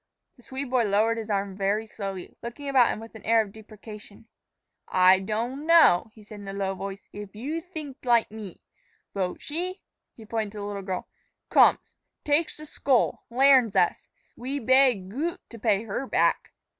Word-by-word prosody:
The 245 - -20
Swede 265 +1 -6
boy 250 -3 +3
lowered 215 +3 +2
his 220 -1 -7
arm 200 -1 -1
very 200 +3 0
slowly, 195 -4 -7
looking 240 +5 -7
about 260 -4 +4
him - - -2
with 225 +1 -11
an 220 - -11
air 225 +2 +3
of 200 - -12
deprecation. 215 0 -12 0.6
"Ay 185 0 +5
doan 235 +9 -3
know," 325 - +6
he 215 - -15
said 210 0 -11
in 200 - -10
a 195 - -5
low 195 -1 -2
voice, 195 +1 -7
"eef 205 -1 -9
yo 285 +9 -3
theenk 315 -6 -8
like 235 -4 +3
me. 210 -5 -9 0.5
Bote 185 -2 -3
she" 360 +5 -4 0.3
he 225 - -13
pointed 220 -1 -3
to - - -9
the 205 - -5
little 205 -1 -4
girl 190 -1 -4 0.4
"komes, - - +4 0.3
takes 300 +3 +1
th' 305 - -10
skole, 270 -4 +1
lairns 255 -3 +5
us. 175 - +1 0.3
We 260 +4 -4
bay 260 0 +5
gote 275 - -5
to 230 - -10
pay 215 -1 +1
hair 235 +6 -4
back." - - +1
220 Hz, 180 wpm, -26 LUFS, 200-265 Hz, 0.6 s, know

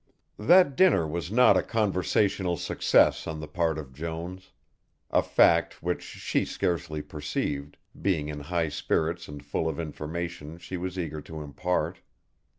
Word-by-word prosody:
That 145 - +6
dinner 160 - +5
was 85 +4 -4
not 125 +3 +6
a - - +4
conversational 95 -3 +1
success - - +3
on 80 -1 -4
the 75 - -6
part 80 0 0
of 70 -4 -8
Jones, 85 +5 -6 0.6
a - - +4
fact - - +3
which 90 +1 -1
she - - -2
scarcely 80 -3 -2
perceived, 75 -1 -4 0.2
being 80 -7 +1
in 75 -1 -5
high 80 +2 -1
spirits 80 +3 -1
and 75 -1 -9
full 80 - -1
of 80 - -4
information 80 0 -5
she 90 - -7
was 90 +1 -4
eager 80 -4 -3
to 80 +1 -8
impart. 90 +5 -2
85 Hz, 150 wpm, -27 LUFS, 75-90 Hz, 0.6 s, That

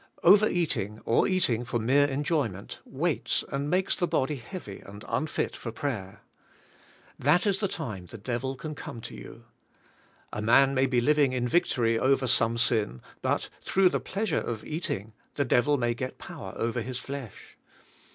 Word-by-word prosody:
Overeating 170 - +4
or 115 - +3
eating 130 - +2
for 125 0 -2
mere 135 +6 +4
enjoyment, 140 - -2
weights - - 0
and 140 +1 -2
makes 185 +3 +2
the 175 - 0
body 150 -3 0
heavy 120 - -8
and 100 +1 -11
unfit 155 - -1
for 115 - -6
prayer. 110 -6 -4 1.0
That 160 - +3
is 200 -2 +2
the 205 - +1
time 110 - -5
the - - -9
devil 125 +5 -3
can 155 +3 -6
come 120 - -7
to - - -8
you. - - -11 0.9
A - - -3
man 135 +5 +5
may 135 0 +3
be 125 -2 +2
living 145 0 +3
in 125 -1 0
victory 120 -7 +2
over 135 0 +3
some 115 -2 +2
sin 110 - +1 0.2
but - - 0
through 190 -1 +4
the - - 0
pleasure 195 -4 -1
of 115 -2 -4
ea.ting 115 - -3 0.2
the 140 - +1
devil 125 +4 +3
may 120 -2 +1
get 130 +2 -5
power 95 - -8
over 115 +1 -1
his 125 +2 -4
flesh. 135 -4 -8
130 Hz, 165 wpm, -28 LUFS, 115-150 Hz, 1.0 s, man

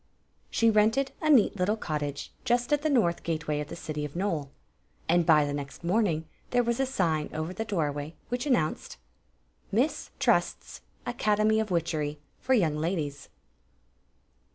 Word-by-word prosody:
She 230 -1 +3
rented 220 +6 +3
a 310 - +1
neat 245 -7 +5
little 200 +4 +1
cottage 145 -6 -4
just 245 +3 +1
at 295 - +2
the 310 - +1
north 220 - +2
gateway 155 -2 -2
of 150 - -4
the - - -7
city 150 -1 -4
of 150 0 -6
Nole, 165 -7 -1 0.6
and 170 0 +3
by 150 -2 +6
the 145 - -3
next 140 +2 -6
morn 205 +6 +2
ing 160 -2 -2 0.2
there 245 0 +3
was 235 +1 -1
a 270 - +2
sign 165 - 0
over 155 +3 -3
the 220 +4 -3
doorway 155 -6 -2
which 245 +4 -2
an 270 - +4
nounced: 155 -9 -1 0.7
MISS 250 +9 0
TRl^TS - - +1 0.3
ACADEMY 215 -2 +2
OF 220 -1 -1
WTTCHERY 160 -4 -1 0.2
FOR 260 - +2
YOUNG 160 -9 +2
LADIES. 155 -4 -2
175 Hz, 165 wpm, -28 LUFS, 155-230 Hz, 0.7 s, by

